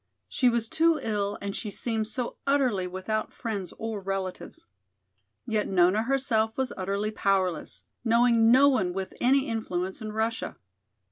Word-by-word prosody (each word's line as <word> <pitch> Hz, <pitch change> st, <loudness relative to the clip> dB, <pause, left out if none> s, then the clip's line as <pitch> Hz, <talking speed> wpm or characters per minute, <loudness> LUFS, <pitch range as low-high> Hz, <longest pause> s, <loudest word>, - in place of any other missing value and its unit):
She 255 Hz, -4 st, +2 dB
was 235 Hz, -1 st, 0 dB
too 325 Hz, +4 st, +3 dB
ill 205 Hz, -2 st, -2 dB
and 200 Hz, -1 st, -3 dB
she 215 Hz, -, -4 dB
seemed 220 Hz, +1 st, -2 dB
so 235 Hz, +2 st, -4 dB
utterly 255 Hz, -10 st, +2 dB
without 190 Hz, +4 st, -3 dB
friends 205 Hz, -6 st, -4 dB
or 225 Hz, -2 st, -4 dB
relatives. 190 Hz, -1 st, -5 dB, 0.8 s
Yet 215 Hz, -1 st, 0 dB
Nona 185 Hz, +3 st, +3 dB
herself 225 Hz, -3 st, +1 dB
was 265 Hz, -1 st, -1 dB
utterly 200 Hz, +3 st, -2 dB
powerless, 190 Hz, -5 st, 0 dB, 0.2 s
knowing 230 Hz, -1 st, +4 dB
no 265 Hz, +4 st, +7 dB
one 190 Hz, -11 st, +2 dB
with 190 Hz, 0 st, -4 dB
any 270 Hz, +2 st, +3 dB
influence 190 Hz, -5 st, -3 dB
in 215 Hz, -1 st, -5 dB
Russia. 220 Hz, +1 st, -2 dB
220 Hz, 145 wpm, -27 LUFS, 195-235 Hz, 0.8 s, no